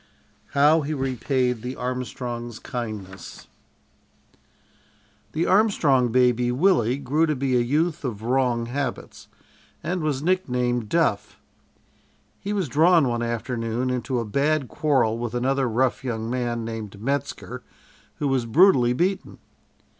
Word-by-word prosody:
HOW 150 +3 +5
HE 150 +1 -3
REPAID 130 -2 -1
THE 125 +2 -5
ARMSTRONGS' 125 -2 -4
KINDNESS 110 -7 -7 1.9
The 160 +3 0
Armstrong 160 - +3
baby, 125 0 +3
Willie, 130 - +2
grew 150 +4 +1
to 155 - 0
be 130 -1 0
a - - +4
youth 155 +7 0
of 110 -5 -4
wrong 125 -1 +1
habits, 130 +1 -5 0.6
and 175 +3 -2
was 150 -3 -1
nicknamed 125 - 0
"Duff." - - 0 1.0
He 200 - -5
was 195 -5 -1
drawn, 160 +2 +4
one 120 0 -1
afternoon, 120 +1 -2
into 125 +1 -2
a 115 - -3
bad 140 +5 0
quarrel 130 -7 +1
with 120 0 -4
another 130 +1 +1
rough 125 +3 0
young 115 -2 -3
man, 120 -2 -2
named 110 -3 -6
Metzker, 140 +4 -3 0.5
who 145 - -2
was 130 -3 0
brutally 125 - +5
beaten. 185 +8 -1
125 Hz, 125 wpm, -24 LUFS, 120-145 Hz, 1.9 s, HOW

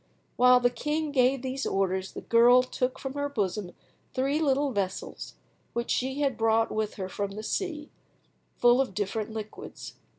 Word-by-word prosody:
While 250 0 +6
the 245 0 +2
king 300 +5 -2
gave 260 -1 +2
these 265 +1 -3
orders 190 -1 -1
the - - -6
girl 240 +2 +6
took 255 0 -2
from 270 -1 -5
her 285 0 -2
bosom 200 -7 -2 0.4
three 275 +4 +1
little 280 -1 +2
vessels, 195 -4 -4 0.4
which 235 0 -2
she 265 +3 -1
had 270 -5 0
brought 225 0 +2
with 215 -1 -2
her 190 -2 -4
from 200 +1 -4
the 215 +1 -6
sea, 310 - -3 0.7
full 245 +2 +5
of 250 -8 -3
different 210 +2 -2
liquids. 215 -1 -8
245 Hz, 165 wpm, -28 LUFS, 210-270 Hz, 0.7 s, While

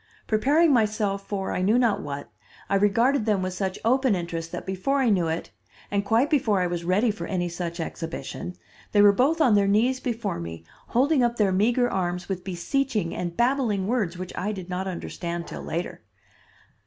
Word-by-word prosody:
Preparing 285 +9 +3
myself 210 -4 0
for 195 -2 -3
I - - -1
knew 210 +6 +3
not 235 -4 +2
what, 140 -1 -6 0.4
I - - +2
regarded 220 +5 +3
them 200 -3 +2
with 185 0 -2
such 190 0 -2
open 255 -1 +3
interest 170 -2 -4
that - - -6
before 190 +9 -1
I 265 -3 +3
knew 180 -4 +2
it, 160 +1 -3 0.4
and 200 0 +1
quite 225 +6 +3
before 245 -10 +2
I 180 - +1
was 175 -1 -2
ready 200 +7 +2
for 170 -5 -6
any 180 -2 -1
such 170 0 -5
exhibition, 165 +2 -5 0.4
they 205 - +6
were 205 - +8
both 280 +10 +2
on 255 -8 +5
their 200 -1 +4
knees 235 +6 +2
before 230 - -3
me, 85 -1 -7 0.2
holding 270 +3 +3
up 240 0 +1
their 205 -3 +3
meager 235 +6 +2
arms 180 -4 -2
with 185 -2 -4
beseeching 205 +2 -1
and 175 -1 -4
babbling 240 -6 +1
words 200 -6 -1
which 185 0 -6
I 205 +4 -2
did 190 -3 -7
not 185 +1 -3
understand 170 -1 -4
till - - -7
later. 170 +2 -4
200 Hz, 190 wpm, -25 LUFS, 180-240 Hz, 0.4 s, were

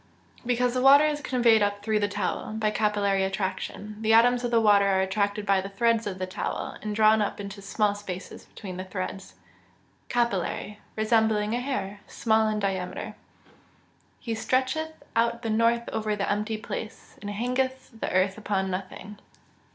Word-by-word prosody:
_ - - -12
Because 245 0 +1
the 255 - 0
water 280 +3 +8
is 300 -1 -1
conveyed 235 -5 +3
up 205 0 0
through 215 0 +1
the 205 - +1
towel, 205 +1 -3
by 215 -1 0
capillary 205 -2 +1
attraction. 190 +2 -4
The 220 0 +3
atoms 245 +2 +5
of 240 - 0
the 235 -1 +4
water 205 -2 +5
are 190 -1 +3
attracted 205 +2 -1
by 195 -1 +3
the 195 - -6
threads 230 +2 +1
of 190 -2 -4
the 185 - -2
towel, 185 - -4
and 210 -1 -4
drawn 215 0 +5
up 205 - -2
into 200 0 -6
the - - -10
small 205 +1 +1
spaces 195 -3 -8
between 185 -4 -9
the 185 - -4
threads. 190 0 -6 0.7
Capillary. 210 -3 -1 0.2
Resembling 220 -1 +2
a 240 - 0
hair, 225 -7 -3
small 220 -1 +2
in 215 0 0
diameter. 195 -3 -2
[Verse: - - -11 1.1
"He 230 - -3
stretcheth 260 +7 -1
out 235 +1 +1
the 225 - -1
north 230 +2 +2
over 215 -1 -1
the 200 -1 -2
empty 210 +2 -1
place, 215 0 -7
and 205 - -5
hangeth 255 +5 -2
the - - -2
earth 190 +3 +1
upon 190 -3 -1
nothing." 195 +2 -6
215 Hz, 180 wpm, -26 LUFS, 200-230 Hz, 1.1 s, water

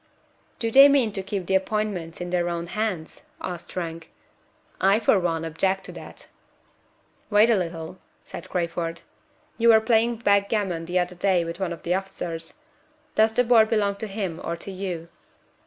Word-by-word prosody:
"Do 230 -1 -2
they 275 +3 +9
mean 275 -6 +3
to 195 - -4
keep 195 -1 -4
the 190 - -1
appointments 190 -4 -1
in 175 0 -5
their 175 -1 +1
own 170 0 -3
hands?" 190 -4 -3 0.2
asked 175 -2 -7
Frank. 165 -2 -5 0.7
"I 195 +3 +4
for 215 - +3
one 165 -2 -1
object 190 +4 0
to - - -9
that." - - -11 1.0
"Wait 215 +2 +5
a - - +5
little," 170 -1 -4 0.3
said - - -9
Crayford. 170 -1 -2 0.6
"You 235 +1 +5
were 220 -1 +8
playing 225 +1 +2
backgammon 200 -5 +1
the 175 +2 -1
other 180 0 0
day 180 -1 +1
with 170 +2 -6
one 190 -3 -2
of 170 - -7
the 175 - 0
officers. 180 -3 -5 0.6
Does 220 +1 +3
the 250 - +4
board 230 -2 +5
belong 205 -3 +1
to 220 - -4
him 195 -5 -4
or 170 - -2
to 195 - -8
you?" 180 -3 -5
190 Hz, 170 wpm, -25 LUFS, 170-215 Hz, 1.0 s, they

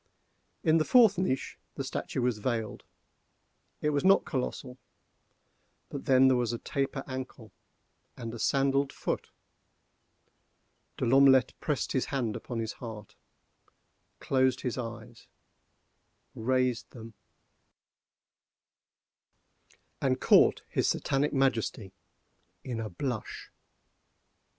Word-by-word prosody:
In 160 +1 +4
the - - +3
fourth 225 -2 +5
niche 135 -8 -2 0.2
the - - -3
statue 130 - -3
was 120 -3 0
veiled; 115 -1 -3 1.0
it 150 - +1
was 145 -1 0
not 195 +1 +5
colossal. 130 0 -4 1.1
But - - -7
then 130 0 +5
there 130 - +4
was 120 -2 0
a 120 - -3
taper 135 +1 -3
ankle, 130 -4 -7 0.7
a 120 - -8
sandalled 135 +2 +1
foot. - - -4 1.7
De - - -1
L'Omelette 135 +1 +5
pressed 145 -4 -2
his 130 - 0
hand 125 -6 -2
upon 120 - -6
his 115 -1 -3
heart, 110 -4 -9 1.1
closed 130 -1 +1
his 125 - -2
eyes, 115 -1 -8 1.1
raised 125 +1 0
them, 115 -2 -11 2.9
and 130 -1 +1
caught - - +5
his - - 0
Satanic 140 +2 0
Majesty—in 115 - -4
a 110 -1 -4
blush. 110 +4 -5
130 Hz, 100 wpm, -29 LUFS, 115-135 Hz, 2.9 s, fourth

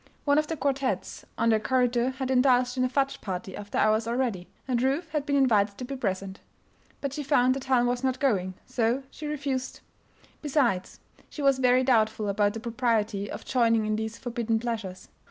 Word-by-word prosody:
One 285 0 +4
of 305 - -1
the 325 - -3
quartettes 275 -1 -2
on 230 - +2
their 220 -1 +4
corridor 245 +2 +1
had 265 0 -3
indulged 250 -1 +3
in 255 - +1
a 255 - +1
fudge 275 +1 0
party 190 -1 -5
after 205 0 -6
hours 215 +1 +2
already, 235 -7 -1 0.2
and 245 -2 0
Ruth 275 +6 0
had 300 -1 -2
been 285 - +1
invited 215 -7 +3
to 250 - -5
be 275 +2 -5
present. 195 -5 -3 0.6
But 280 -2 -3
she 295 - -3
found 255 -3 +3
that 270 0 -6
Helen 255 -2 +3
was 245 +1 -1
not 260 -1 0
going, 190 -9 0
so 250 +1 0
she 305 - -7
refused. 275 -3 -3 0.6
Besides, 265 -11 0 0.3
she 295 - -6
was 275 -1 +4
very 255 0 +4
doubtful 220 -4 +2
about 205 0 +1
the - - -3
propriety 225 -4 -1
of - - -7
joining 230 -3 +2
in 215 0 0
these 220 +1 -4
forbidden 235 -2 -1
pleasures. 220 -5 -5
245 Hz, 190 wpm, -27 LUFS, 220-265 Hz, 0.6 s, One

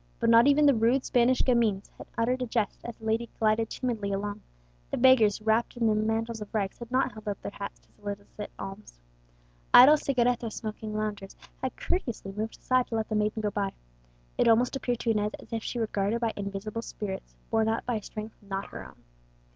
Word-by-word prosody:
But 230 - +3
not 230 +3 +7
even 290 +1 +5
the 285 - +7
rude 240 +3 +2
Spanish 245 +1 +3
gamins 225 -6 +1
had - - -11
uttered 250 +3 +1
a 250 - -1
jest 220 -3 -1
as 235 - -7
the 220 - -12
lady 225 +1 0
glided 220 0 +2
timidly 225 -6 -2
along; 205 +1 -3 0.5
the - - -2
beggars, 240 -5 +5
wrapped 220 +3 +1
in 235 - +1
their 220 - +4
mantles 220 +1 -1
of 210 - -7
rags, 195 -3 -1
had 235 -1 -8
not 260 +2 +1
held 215 0 -12
out 205 -1 -2
their - - -4
hats 200 0 -7
to - - -30
solicit 205 0 -7
alms. 195 - -8 0.8
Idle 280 +5 +10
cigaretto 245 -4 +1
smoking 215 0 -6
loungers 210 -2 -3 0.3
had 260 - -3
courteously 235 - -3
moved 215 +3 -4
aside 255 -1 +1
to 230 - -4
let 220 -1 -1
the 215 - -1
maiden 210 +1 0
go 210 - 0
by. 200 -2 -2 0.7
It - - +4
almost 235 +3 +4
appeared 245 -3 -2
to 230 - +1
Inez 210 -1 0
as - - -12
if 225 -1 -2
she - - -4
were 230 - +1
guarded 205 +2 -1
by 230 -2 0
invisible 200 +2 -4
spirits, 195 -4 -6 0.2
borne 225 -1 +3
up 225 - -1
by 245 -2 0
a - - -5
strength 215 +2 -7
not 195 -1 -5
her - - -7
own. - - -15
220 Hz, 210 wpm, -28 LUFS, 210-235 Hz, 0.8 s, Idle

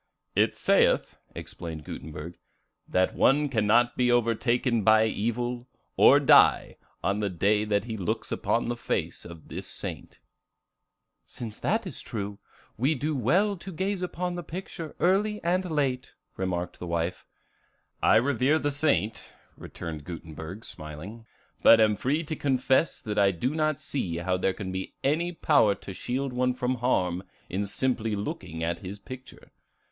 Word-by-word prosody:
"It - - +3
saith," - - +2 0.2
explained 80 -3 -7
Gutenberg, 80 +3 -8 0.5
"that 95 0 +2
one 145 +3 +3
cannot 120 +1 +3
be 125 -1 +2
overtaken 120 0 +2
by 110 +1 +6
evil, 120 +3 -2 0.3
or - - +7
die, - - +5 0.3
on 100 +1 +1
the 105 -1 0
day 105 +4 +2
that 105 -2 +1
he 110 -1 -5
looks 90 -4 -3
upon 115 - 0
the 120 - -1
face 120 - -3
of 85 -2 -11
this - - -6
saint." - - -6 1.1
"Since 110 -3 -8
that - - 0
is - - -7
true, 100 -1 -5 0.4
we 140 +6 +2
do 150 +3 -2
well 180 - +2
to 190 +3 -8
gaze 190 +2 -2
upon 180 0 -3
the 175 - -4
picture 170 -1 -7
early 210 +4 +2
and 180 +2 +1
late," 135 -5 -1 0.2
remarked 90 -2 -3
the 90 - -6
wife. 85 +2 -2 0.8
"I - - +5
revere 140 +5 +3
the 145 -2 -1
saint," 140 -7 0 0.2
returned 80 -3 -7
Gutenberg, 85 +5 -8
smiling, 90 +9 -9 0.3
"but 115 - +8
am 110 -1 +4
free 140 - 0
to 155 0 -4
confess 135 +2 +1
that 105 -2 -1
I 100 -1 +5
do 100 - -1
not 155 -2 0
see 90 -12 -3
how 90 +2 0
there 95 +1 +1
can 95 -2 -5
be 95 0 -5
any 165 +5 +1
power 145 - +3
to 95 - -9
shield 130 +6 -3
one 125 0 +1
from 125 0 -1
harm 90 -8 +1 0.3
in 100 +2 -1
simply 115 -1 0
looking 90 -5 -5
at 85 +1 -1
his 95 +1 -7
picture. 130 +5 -11
115 Hz, 155 wpm, -27 LUFS, 95-140 Hz, 1.1 s, but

